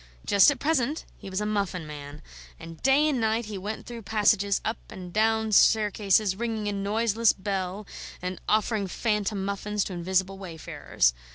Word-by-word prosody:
Just 200 +4 +6
at 290 - 0
present 290 +1 0
he - - -10
was 190 +2 -2
a - - -1
muffin 200 -5 -1
man, 145 0 -9 0.4
and 165 0 -10
day 275 +3 +4
and 270 -6 0
night 220 +1 +1
he 210 -1 -6
went 205 +3 -5
through 235 -1 -7
passages 205 -1 +2
and - - +2
up 225 - -12
and 180 -2 -9
down 220 0 +2
staircases, 210 -1 +4
ringing 220 -1 -3
a - - 0
noiseless 215 +3 +2
bell 195 0 -3 0.3
and 180 0 -5
offering 215 -1 +1
phantom 210 -1 -1
muffins 200 +1 -2
to 190 - -6
invisible 190 +2 -1
wayfarers. 160 - -1
205 Hz, 170 wpm, -27 LUFS, 190-220 Hz, 0.4 s, Just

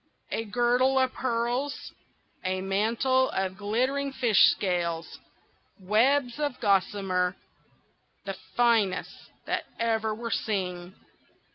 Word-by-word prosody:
A 225 - -2
girdle 245 +4 +2
of 260 -1 +2
pearls! 245 +3 -2 0.5
a 185 0 -1
mantle 230 +7 +1
of 190 -1 -2
glittering 255 +7 -1
fish 240 -6 +5
scales! 170 -4 -1 0.6
webs 245 +7 +2
of 290 -4 -2
gossamer, 195 -2 +1 0.9
the 195 - -3 0.2
finest 230 -5 +1 0.2
that - - -2
ever 225 -1 0
were 230 +1 -5
seen! 185 -3 -2
225 Hz, 100 wpm, -27 LUFS, 190-250 Hz, 0.9 s, fish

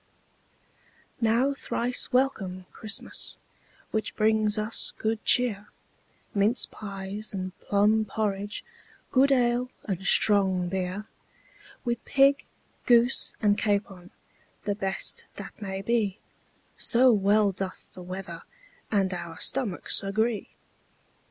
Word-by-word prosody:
Now 235 +5 +3
thrice 250 -2 0
welcome, 195 -9 0
Christmas, 215 -2 -4 0.5
Which 220 -1 -2
brings 215 -1 +2
us 215 +1 +1
good 220 0 -1
cheer, 215 -5 +3 0.7
Minced 210 +5 +2
pies 200 +1 -6
and 185 -1 -3
plum 210 +2 +2
porridge, 205 -1 -3 0.5
Good 275 +2 +4
ale 245 -1 +2
and 190 -2 -3
strong 190 -3 +3
beer; 190 +2 -3 0.8
With 240 -1 -1
pig, 275 0 +3 0.4
goose, 240 +1 +4
and 205 0 +4
capon, 200 -4 -1 0.6
The 205 - +1
best 195 -1 -3
that - - -10
may 195 -1 -4
be, 215 -4 +1 0.6
So 250 +1 +5
well 205 0 +3
doth 190 0 -5
the 185 - -10
weather 180 -1 -7 0.5
And 195 -3 +2
our 170 -2 -6
stomachs 240 -10 0
agree. 215 +3 -1
210 Hz, 105 wpm, -27 LUFS, 195-235 Hz, 0.8 s, So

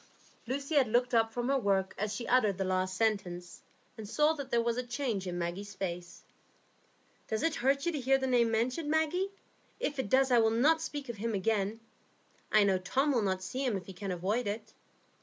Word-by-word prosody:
Lucy 275 +4 -3
had 280 -4 +4
looked 245 +3 +1
up 225 -1 +3
from 240 +1 -2
her 275 0 +2
work 195 -4 +1
as 210 +1 -2
she 235 +3 -4
uttered 215 -7 +3
the 195 - 0
last 185 0 -1
sentence, 180 -5 -1 0.3
and 215 -2 -8
saw 300 +5 +3
that 280 -4 -6
there 235 - +2
was 235 0 0
a 250 - -1
change 240 -6 -3
in 175 -1 -3
Maggie's 185 +4 -4
face. 175 -2 -5 1.0
"Does 220 - -2
it 325 - +2
hurt 275 +3 +2
you 345 - +2
to 300 - -3
hear 270 +1 +3
the 265 - -2
name 245 -3 +3
mentioned, 250 +7 0
Maggie? 320 +5 +1 0.5
If 290 -2 -2
it 230 - -2
does, 265 +2 +4
I 240 - +6
will 225 -1 +4
not 290 +9 +3
speak 290 -3 -5
of 235 -2 -6
him 225 +1 -2
again. 205 +2 0 0.7
I 215 -1 +6
know 195 -2 +2
Tom 265 +10 +1
will 245 -4 +2
not 190 -2 -1
see 255 +8 -3
him 240 -7 +1
if 180 - -8
he 190 - -9
can 195 +2 -6
avoid 195 +6 -1
it." 210 +2 -5
230 Hz, 215 wpm, -31 LUFS, 195-265 Hz, 1.0 s, I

